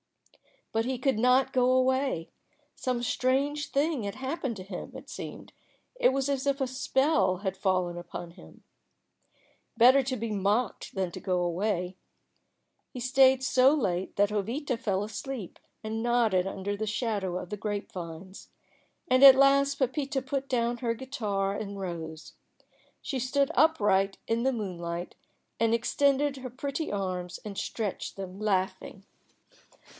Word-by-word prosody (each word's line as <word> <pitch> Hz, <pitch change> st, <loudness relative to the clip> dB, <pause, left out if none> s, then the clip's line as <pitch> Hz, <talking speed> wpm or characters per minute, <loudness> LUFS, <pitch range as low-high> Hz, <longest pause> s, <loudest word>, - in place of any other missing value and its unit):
But 225 Hz, 0 st, 0 dB
he 260 Hz, 0 st, -1 dB
could 255 Hz, -2 st, +1 dB
not 255 Hz, +2 st, +3 dB
go 250 Hz, -1 st, +3 dB
away. 260 Hz, -8 st, +1 dB, 0.5 s
Some 250 Hz, -2 st, -2 dB
strange 275 Hz, +5 st, 0 dB
thing 285 Hz, -3 st, 0 dB
had 200 Hz, -1 st, -4 dB
happened 265 Hz, -1 st, -3 dB
to 190 Hz, -, -8 dB
him, 185 Hz, -1 st, -7 dB
it -, -, -10 dB
seemed; -, -, -8 dB, 0.5 s
it -, -, +5 dB
was 270 Hz, 0 st, 0 dB
as 275 Hz, 0 st, -1 dB
if 280 Hz, 0 st, +1 dB
a 265 Hz, -, +1 dB
spell 265 Hz, -, +1 dB
had 190 Hz, -1 st, -3 dB
fallen 185 Hz, -3 st, 0 dB
upon 175 Hz, 0 st, -7 dB
him. 175 Hz, -, -16 dB, 1.1 s
Better 255 Hz, +4 st, +7 dB
to 260 Hz, 0 st, -2 dB
be 230 Hz, -1 st, -4 dB
mocked 205 Hz, +3 st, -1 dB
than 190 Hz, -2 st, -1 dB
to -, -, -7 dB
go 180 Hz, -2 st, 0 dB
away. 180 Hz, +1 st, -1 dB, 0.9 s
He 250 Hz, -, -8 dB
stayed 260 Hz, +1 st, +4 dB
so 260 Hz, +3 st, +5 dB
late 185 Hz, -10 st, -1 dB
that 205 Hz, 0 st, +3 dB
Jovita 230 Hz, +6 st, -2 dB
fell 200 Hz, -3 st, -1 dB
asleep 220 Hz, 0 st, -6 dB, 0.2 s
and 220 Hz, +1 st, -3 dB
nodded 225 Hz, -6 st, +2 dB
under 195 Hz, +1 st, -3 dB
the 215 Hz, +1 st, -3 dB
shadow 205 Hz, -5 st, -1 dB
of 180 Hz, -, -6 dB
the 210 Hz, -, -4 dB
grape 205 Hz, 0 st, -4 dB
vines. 175 Hz, +2 st, -8 dB, 0.6 s
And 255 Hz, +1 st, +4 dB
at 270 Hz, -1 st, +12 dB
last 275 Hz, +1 st, +4 dB
Pepita 270 Hz, +1 st, -1 dB
put 270 Hz, +1 st, -3 dB
down 240 Hz, -2 st, 0 dB
her 235 Hz, -2 st, -1 dB
guitar 210 Hz, -6 st, -2 dB
and 200 Hz, -1 st, -5 dB
rose. 165 Hz, -4 st, -6 dB, 0.7 s
She 270 Hz, -, -3 dB
stood 275 Hz, +3 st, +1 dB
upright 205 Hz, -11 st, +3 dB
in 230 Hz, +1 st, 0 dB
the 265 Hz, +1 st, +2 dB
moonlight, 175 Hz, -5 st, -4 dB, 0.4 s
and 230 Hz, 0 st, +3 dB
extended 280 Hz, +4 st, +1 dB
her 255 Hz, -1 st, -6 dB
pretty 275 Hz, +5 st, -4 dB
arms 185 Hz, -3 st, -3 dB
and 200 Hz, -2 st, -6 dB
stretched 215 Hz, -4 st, -3 dB
them, 190 Hz, 0 st, -7 dB
laughing. 195 Hz, -2 st, -2 dB
230 Hz, 150 wpm, -28 LUFS, 195-265 Hz, 1.1 s, at